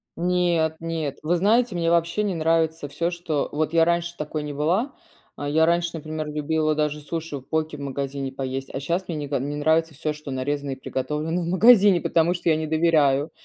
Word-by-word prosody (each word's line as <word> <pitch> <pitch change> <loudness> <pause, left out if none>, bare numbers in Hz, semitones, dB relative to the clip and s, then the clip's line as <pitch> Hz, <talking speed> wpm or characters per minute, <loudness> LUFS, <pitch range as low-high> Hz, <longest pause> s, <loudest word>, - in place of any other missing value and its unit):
Нет, 175 -2 +1
нет! 160 -4 -3
Вы 165 +3 +1
знаете, 215 +3 +2
мне 165 -1 +1
вообще 170 +4 +1
не 200 -2 -1
нравится 160 -1 +1
всё, 170 +5 -2
что 170 -4 -2
вот 155 +2 -1
я 165 -1 +5
раньше 170 0 0
такой 150 0 -4
не 150 -1 -5
была, 180 - 0 0.4
а, 145 - -5
я 160 +2 +3
раньше, 170 0 +1
например, 155 -1 -5
любила 155 +1 0
даже 150 0 -1
суши 160 0 -5
в - - -9
поке 155 -1 -2
в - - -9
магазине 140 0 -4
поесть, 135 0 -5
а - - -3
щас 170 +6 -2
мне 170 - -3
не 150 -1 -3
нико 140 0 -1
не 145 +3 -3
нравится 160 +2 +1
всё, 155 +1 -3
что 150 -1 -9
нарезано 140 +2 -2
и - - -3
приготовлено 150 +6 -3
в - - -4
магазине, 195 0 +6
потому 170 +1 +2
что 175 -1 -1
я 160 - +4
не 155 0 -2
доверяю 155 -2 +2
160 Hz, 210 wpm, -24 LUFS, 145-170 Hz, 0.4 s, магазине